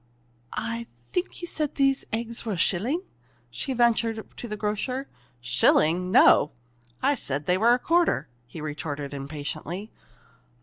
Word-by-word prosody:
"I 230 +1 -3 0.2
think 360 0 -3
you - - -2
said 305 -4 -2
these 275 -1 +2
eggs 230 +1 -2
were 220 -3 -2
a - - -3
shilling?" 230 - +1 0.5
she 270 - -4
ventured 230 -2 +1
to 240 - -6
the 210 -1 -5
grocer. 250 +6 -2 0.3
"Shilling 170 +8 +3
no! 150 -5 +6 0.5
I 280 - +4
said 145 - -3
they 180 - +3
were 230 +5 +5
a - - 0
quarter," 330 - +2 0.2
he 150 +6 -9
retorted 145 -1 -4
impatiently. 155 +7 -5
220 Hz, 140 wpm, -26 LUFS, 155-250 Hz, 0.5 s, no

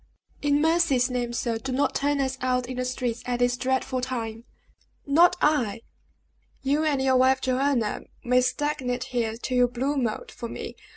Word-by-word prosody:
In 290 0 +2
mercy's 305 -6 +3
name, 245 -1 -2
sir, 235 -1 -2
do 265 +2 -5
not 275 +3 +1
turn 285 0 0
us 265 -1 0
out 250 -1 +1
in 255 0 -6
the 255 - -1
streets 250 -2 -2
at 245 -1 0
this 245 0 +2
dreadful 260 0 -1
time!" 230 -3 -4 0.6
"Not 330 +5 +5
I! 245 -9 +2 0.8
You 285 +3 +1
and 295 -3 +1
your 265 -1 +3
wife 260 +1 +4
Joanna 260 -3 0 0.2
may 250 +1 +3
stagnate 255 -2 -1
here 230 -3 -2
till 250 +2 -2
you 245 0 +5
blue 265 +4 -2
mold, 235 -5 -2
for 235 -2 -7
me. - - -7
255 Hz, 175 wpm, -26 LUFS, 245-275 Hz, 0.8 s, Not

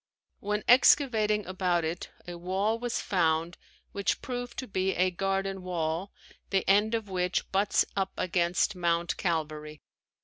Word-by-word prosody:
When 210 +1 -2
excavating 220 -5 +5
about 180 -2 0
it 165 +2 -4 0.2
a 175 - -6
wall 190 +6 -1
was 245 0 -2
found 165 -2 0 0.3
which 200 -1 -1
proved 245 -1 -5
to 255 - -4
be 190 -1 -1
a 185 +1 +2
garden 195 +1 -2
wall 175 +1 -2 0.4
the 195 -1 0
end 210 +3 +4
of 225 -2 -3
which 180 -1 -1
butts 200 +2 +2
up 195 -1 0
against 180 +2 +1
Mount 170 -1 0
Calvary. 155 -3 -3
190 Hz, 140 wpm, -29 LUFS, 175-210 Hz, 0.4 s, excavating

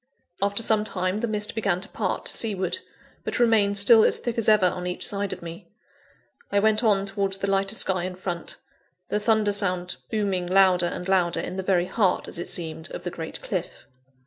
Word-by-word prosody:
After 200 +3 0
some 220 -1 +3
time, 185 -1 -2
the 235 - -1
mist 210 -1 -1
began 200 -5 0
to 190 - -5
part - - -3
to - - -1
seaward, 190 -5 -1 0.4
but - - -3
remained 220 -4 +3
still 215 +2 +7
as - - +3
thick 240 -2 -4
as 220 - +2
ever 210 -3 +5
on 180 0 -1
each 180 - -2
side 200 -3 -2
of - - -7
me. 170 +2 -9 0.8
I 200 - +1
went 215 +2 +3
on 200 -3 +3
towards 195 -1 -1
the 195 - -3
lighter 195 +1 0
sky 185 -4 +1
in 185 0 -5
front 175 -2 -5 0.5
the 210 - 0
thunder 215 -1 +2
sound 180 -3 0
booming 195 -5 -1
louder 185 -1 +4
and 180 - -5
louder, 180 -3 +1
in - - -5
the 190 - -2
very 185 -2 +1
heart, 190 -1 0
as 170 - -5
it - - -5
seemed, 160 -1 -4
of - - -8
the 175 - -4
great 165 -2 -6
cliff. 185 -4 -5
195 Hz, 205 wpm, -25 LUFS, 180-210 Hz, 0.8 s, still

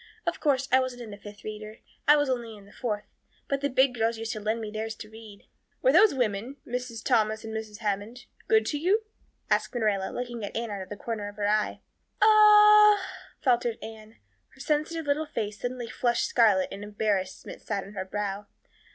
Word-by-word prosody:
Of - - -2
course, 275 -3 +1
I 260 - +6
wasn't 255 -2 -3
in 220 - -9
the 205 - -8
Fifth 205 0 -12
Reader 215 +1 -7 0.3
I 295 +1 +7
was 290 -1 +1
only 235 -4 -3
in 200 - -15
the 200 - -17
Fourth 210 -4 -3 0.4
but 275 0 -1
the 285 - 0
big 260 0 +3
girls 230 -1 0
used 225 0 -4
to 215 - -5
lend 215 +2 -1
me 215 -2 -5
theirs 220 +1 -4
to 215 -1 -11
read." 220 -2 -13 0.4
"Were - - +5
those 425 - +6
women 240 +2 -2
Mrs. 245 -2 -5
Thomas 220 -3 +2
and 220 0 -6
Mrs. 220 -1 -6
Hammond 210 +3 -3 0.2
good 440 0 +4
to 295 - -2
you?" 390 +8 +2 0.5
asked - - +1
Marilla, 205 -5 0
looking 240 -2 -5
at 205 - -4
Anne 230 -1 -3
out 200 -1 -4
of 190 - -9
the 205 - -7
corner 215 -1 -4
of 205 - -13
her 205 -1 -1
eye. 210 0 0 0.4
"O - - +5
o 420 -1 +8
o - - -5
h," 380 - -11
faltered 240 -3 +2
Anne. 220 0 -10 0.4
Her - - -21
sensitive 305 +3 -1
little 295 +2 0
face 210 -5 -4
suddenly 245 -1 -3
flushed 240 +1 0
scarlet 210 -6 +3
and 195 +1 -7
embarrassment 205 -2 -3
sat 200 -2 -3
on 200 - -12
her 195 - -3
brow. 205 +1 -4
225 Hz, 210 wpm, -27 LUFS, 210-265 Hz, 0.5 s, o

